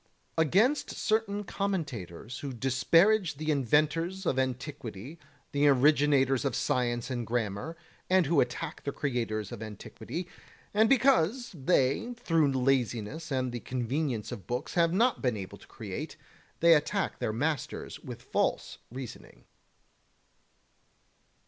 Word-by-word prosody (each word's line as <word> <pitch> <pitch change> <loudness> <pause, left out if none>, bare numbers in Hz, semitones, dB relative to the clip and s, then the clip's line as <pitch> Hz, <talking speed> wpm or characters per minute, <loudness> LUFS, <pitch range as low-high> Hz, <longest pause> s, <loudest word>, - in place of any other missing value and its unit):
29. 160 -1 +4
Against 245 - +3
certain 215 -2 0
commentators 130 - -4
who 140 - -5
disparage 165 - +3
the 155 +2 -1
inventors 155 - +1
of 130 - +1
antiquity, 130 - -4 0.3
the 145 +1 +3
originators 140 -1 +4
of 135 -5 -1
science 120 0 0
and 120 -2 -3
grammar, 115 +6 -2 0.3
and 185 -1 +4
who 145 0 +3
attack 140 +6 -3
the 140 - -2
creators 115 -7 -2
of 120 -3 -7
antiquity; 110 - -6 0.5
and 220 +2 +4
because 250 -3 +3
they 160 - +1
through 165 -10 +2
laziness 130 +2 0
and 130 -2 0
the 120 - -4
convenience 125 -1 -2
of 95 - -8
books 125 +1 -3
have 170 -1 +3
not 235 +7 +2
been 125 -5 0
able 95 -2 -7
to - - -17
create, - - -6 0.4
they 170 0 +8
attack 185 +6 0
their - - -1
masters 145 +5 -3
with - - -9
false - - -1
reasoning. 125 0 -9
140 Hz, 130 wpm, -29 LUFS, 120-170 Hz, 0.5 s, they